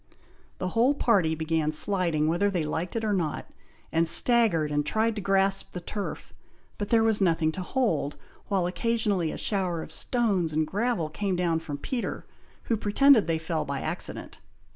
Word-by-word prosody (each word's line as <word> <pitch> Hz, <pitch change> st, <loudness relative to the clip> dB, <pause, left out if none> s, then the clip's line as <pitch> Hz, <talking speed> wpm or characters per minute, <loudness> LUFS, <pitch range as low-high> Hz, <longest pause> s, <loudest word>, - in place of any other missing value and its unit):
The 185 Hz, -, -2 dB
whole 240 Hz, +8 st, +3 dB
party 190 Hz, -, +2 dB
began 160 Hz, -1 st, 0 dB
sliding 165 Hz, -2 st, 0 dB
whether 175 Hz, +5 st, +2 dB
they 180 Hz, -5 st, -1 dB
liked 160 Hz, +5 st, -3 dB
it 225 Hz, -, -1 dB
or 215 Hz, -1 st, +1 dB
not, 165 Hz, -6 st, -2 dB, 0.5 s
and 165 Hz, 0 st, +1 dB
staggered 205 Hz, -10 st, +3 dB
and 145 Hz, 0 st, +1 dB
tried 220 Hz, +8 st, 0 dB
to 210 Hz, -, -4 dB
grasp 195 Hz, 0 st, 0 dB
the 180 Hz, -, -4 dB
turf, 200 Hz, +3 st, -6 dB, 0.5 s
but 205 Hz, -, -3 dB
there 225 Hz, -1 st, +4 dB
was 220 Hz, -2 st, +2 dB
nothing 165 Hz, -3 st, +2 dB
to 185 Hz, -, -6 dB
hold, 180 Hz, -, -1 dB, 0.3 s
while 190 Hz, -3 st, +1 dB
occasionally 200 Hz, -3 st, 0 dB
a -, -, -6 dB
shower 180 Hz, -5 st, -1 dB
of -, -, -11 dB
stones 200 Hz, -10 st, 0 dB
and 155 Hz, +1 st, +1 dB
gravel 210 Hz, -1 st, -1 dB
came 190 Hz, +5 st, -2 dB
down 170 Hz, -2 st, +1 dB
from 150 Hz, -3 st, -6 dB
Peter, 240 Hz, -, -4 dB, 0.4 s
who 230 Hz, -, 0 dB
pretended 220 Hz, +2 st, +4 dB
they 165 Hz, -1 st, +1 dB
fell 160 Hz, -1 st, -2 dB
by 140 Hz, -1 st, -4 dB
accident. -, -, -5 dB
185 Hz, 175 wpm, -27 LUFS, 160-215 Hz, 0.5 s, there